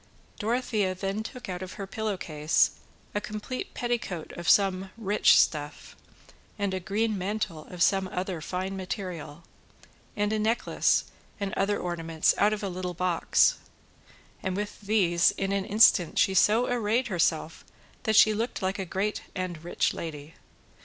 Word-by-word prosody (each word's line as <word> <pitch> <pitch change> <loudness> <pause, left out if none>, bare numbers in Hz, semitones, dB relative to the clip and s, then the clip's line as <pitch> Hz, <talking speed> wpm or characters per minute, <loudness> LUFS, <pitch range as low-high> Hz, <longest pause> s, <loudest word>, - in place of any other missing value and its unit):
Dorothea 215 -4 0
then 195 +3 -3
took 250 +3 -8
out 180 -1 -5
of 185 -1 -6
her 200 - -6
pillow 215 0 -3
case 155 -3 +2 0.4
a 205 - -1
complete 215 +5 -6
petticoat 230 -9 -3
of 170 -1 -3
some 195 -1 +3
rich 210 -2 +4
stuff, 150 -1 -1 0.6
and 200 -2 -1
a 185 - -1
green 210 +4 -1
mantle 190 -5 -3
of 180 -2 -1
some 195 -1 +2
other 180 -2 -4
fine 185 +4 -3
material, 180 -5 -6 0.7
and 205 +1 +1
a 215 - 0
necklace 225 +2 +2 0.4
and 200 -1 -3
other 205 +1 +1
ornaments 165 -2 0
out 205 +1 +4
of 215 -1 -3
a - - -1
little 180 -1 -4
box, 180 -1 +2 0.8
and 185 0 -2
with 210 0 -5
these 190 -4 +3
in 195 0 -1
an 200 -1 0
instant 205 -5 +5
she 190 - +4
so 215 +5 +4
arrayed 235 0 0
herself 165 -3 0 0.4
that 220 -3 0
she 215 0 +7
looked 230 +3 -2
like 190 +2 -1
a 190 - -2
great 195 +4 -2
and 175 -3 -4
rich 175 - 0
lady. 155 -1 -7
195 Hz, 155 wpm, -27 LUFS, 180-210 Hz, 0.8 s, she